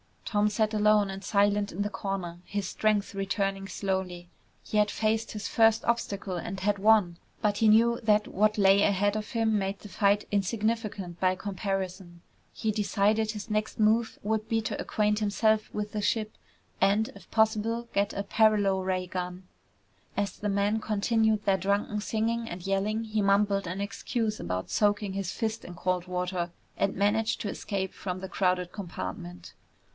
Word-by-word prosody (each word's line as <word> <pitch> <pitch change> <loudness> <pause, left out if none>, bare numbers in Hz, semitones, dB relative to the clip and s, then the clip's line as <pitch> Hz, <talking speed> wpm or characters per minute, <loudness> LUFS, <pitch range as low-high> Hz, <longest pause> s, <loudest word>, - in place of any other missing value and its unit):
Tom 210 -1 +2
sat 215 +1 0
alone 210 -1 +3
and 195 +1 -7
silent 205 0 +2
in 190 - -3
the 205 - 0
corner, 190 -3 -4
his 205 -1 -3
strength 210 0 0
returning 195 0 -2
slowly. 185 -3 -3 0.3
He 215 - -2
had 210 0 +4
faced 220 +1 0
his 210 -2 -4
first 225 -1 +4
obstacle 200 -5 -1
and 180 +3 -5
had 205 +1 +1
won. 205 -5 +4 0.2
But 205 -1 +1
he 225 - +3
knew 230 +2 +5
that 210 -1 +3
what 210 +2 +2
lay 195 0 +5
ahead 205 +1 +2
of 215 - -5
him 220 -2 +1
made 195 0 -3
the 210 - -11
fight 200 +1 +2
insignificant 205 -3 -1
by 185 0 +2
comparison. 190 -2 -4 0.3
He 220 - -1
decided 210 +1 +1
his 210 +1 -7
next 215 0 -1
move 220 +1 +2
would 215 +1 -1
be 225 -1 +1
to - - -3
acquaint 210 0 +1
himself 215 +1 +1
with 210 0 -3
the 215 - -2
ship 215 +1 0 0.5
and, 210 +3 +3
if 200 - -15
possible, 225 +1 +1
get 200 0 +1
a 200 - -2
paralo 205 -2 +3
ray 185 -1 -1
gun. 180 0 -5 0.7
As 200 -2 -2
the 210 - -1
men 200 +2 +1
continued 220 0 +1
their 195 -1 +3
drunken 200 +3 0
singing 225 +2 -1
and 175 0 -7
yelling 200 +3 0
he 215 -1 -1
mumbled 200 -1 +2
an 185 +3 -3
excuse 220 +1 -2
about 90 0 -3
soaking 205 -1 +1
his 195 -2 -3
fist 220 0 -3
in 175 - -9
cold 180 +1 -1
water 180 -1 -2 0.3
and 195 - 0
managed 210 +3 +1
to 205 - -2
escape 195 -2 -3
from 185 -1 -5
the 190 - -6
crowded 180 -2 0
compartment. 95 - -7
205 Hz, 170 wpm, -28 LUFS, 190-215 Hz, 0.7 s, knew